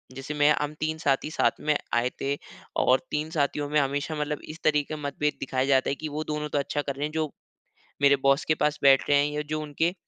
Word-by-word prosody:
जैसे 135 Hz, +3 st, -5 dB
मैं 145 Hz, 0 st, +4 dB
हम 150 Hz, 0 st, -2 dB
3 155 Hz, 0 st, -1 dB
साथी 145 Hz, -2 st, 0 dB
साथ -, -, +1 dB
में 150 Hz, 0 st, +2 dB, 0.2 s
आये 120 Hz, +1 st, +2 dB
थे। 140 Hz, +1 st, 0 dB, 0.5 s
और 130 Hz, +1 st, +4 dB
तीन 150 Hz, +1 st, -1 dB
साथियों 145 Hz, -1 st, 0 dB
में 150 Hz, +1 st, +3 dB
हमेशा 145 Hz, +3 st, -1 dB
मतलब 150 Hz, 0 st, -2 dB
इस 155 Hz, +2 st, -8 dB
तरीक़े 150 Hz, 0 st, +1 dB
मतभेद 150 Hz, 0 st, -1 dB
दिखाया 130 Hz, 0 st, -1 dB
जाता 135 Hz, -1 st, +3 dB
है 140 Hz, -, 0 dB
की 155 Hz, -, -5 dB
वो 150 Hz, +1 st, -3 dB
दोनों 150 Hz, 0 st, -3 dB
तो 145 Hz, -, -1 dB
अच्छा 145 Hz, +1 st, -1 dB
कर 140 Hz, -1 st, -3 dB
रहे 145 Hz, +2 st, -2 dB
हैं 150 Hz, -, -4 dB
जो 155 Hz, -2 st, -1 dB, 0.7 s
मेरे 140 Hz, 0 st, +6 dB
बॉस 140 Hz, +1 st, +4 dB
के 155 Hz, -, +2 dB
पास 150 Hz, 0 st, +1 dB
बैठ 135 Hz, -1 st, +6 dB
रहे 145 Hz, -, +5 dB
है, 145 Hz, -, +3 dB
या 150 Hz, -, -1 dB
जो 155 Hz, +1 st, -3 dB
उनके 155 Hz, +3 st, -1 dB
145 Hz, 240 wpm, -26 LUFS, 140-150 Hz, 0.7 s, मेरे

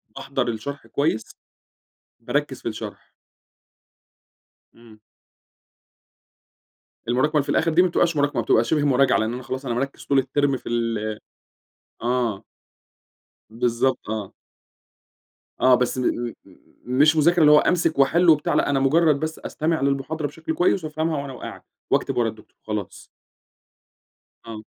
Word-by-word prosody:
باحضَر -, -, -3 dB
الشرح 130 Hz, +6 st, -6 dB
كويس، 140 Hz, -6 st, 0 dB, 1.0 s
باركِّز -, -, -2 dB
في -, -, -2 dB
الشرح. -, -, -8 dB, 1.6 s
إمم. 115 Hz, -2 st, -17 dB, 2.1 s
المراكمة 130 Hz, +5 st, +1 dB
اللي 150 Hz, -, +4 dB
في -, -, -16 dB
الآخِر 165 Hz, -, +2 dB
دي 175 Hz, +3 st, +5 dB
ما 185 Hz, -, +3 dB
بتبقاش 170 Hz, -1 st, +1 dB
مراكمة، 145 Hz, -4 st, +1 dB
بتبقى 110 Hz, +1 st, +3 dB
شِبه 150 Hz, +4 st, +1 dB
مراجعة، 135 Hz, -1 st, +3 dB
لأن 110 Hz, +1 st, -1 dB
أنا 125 Hz, -, -6 dB
خلاص، 130 Hz, +2 st, -5 dB
أنا 120 Hz, -, -1 dB
مركِّز 135 Hz, +3 st, -4 dB
طول 140 Hz, -, +2 dB
الترم 135 Hz, +1 st, +1 dB
في -, -, -9 dB
ال 115 Hz, -2 st, -2 dB, 0.8 s
آه. 120 Hz, -4 st, -1 dB, 1.1 s
بالضبط 120 Hz, +1 st, -1 dB
آه. 110 Hz, -3 st, -4 dB, 1.3 s
آه، 130 Hz, 0 st, +6 dB
بس 125 Hz, +1 st, 0 dB
م 130 Hz, -, -1 dB
م 120 Hz, -1 st, -1 dB, 0.5 s
مش 145 Hz, +6 st, +3 dB
مذاكرة 170 Hz, +3 st, +3 dB
اللي 150 Hz, -1 st, +7 dB
هو 150 Hz, -, +8 dB
أمسِك 165 Hz, -3 st, +1 dB
وأحِل 170 Hz, +6 st, +3 dB
وبتاع، 150 Hz, -2 st, +4 dB
لأ -, -, +2 dB
أنا 135 Hz, -1 st, +1 dB
مجرد 150 Hz, +1 st, +3 dB
بس 160 Hz, 0 st, -4 dB
أستمع 160 Hz, +1 st, -2 dB
للمحاضرة 140 Hz, +3 st, -1 dB
بشكْل 160 Hz, +2 st, -5 dB
كويس 175 Hz, 0 st, +1 dB
وأفهَمها 155 Hz, -1 st, -2 dB
وأنا 140 Hz, -1 st, -7 dB
وقاعد 125 Hz, -, -9 dB, 0.3 s
وأكتب -, -, 0 dB
ورا 120 Hz, -2 st, +2 dB
الدكتور 110 Hz, -1 st, -11 dB
وخلاص. 105 Hz, -3 st, -5 dB, 1.4 s
آه. 110 Hz, -1 st, -8 dB
135 Hz, 140 wpm, -23 LUFS, 120-155 Hz, 2.1 s, هو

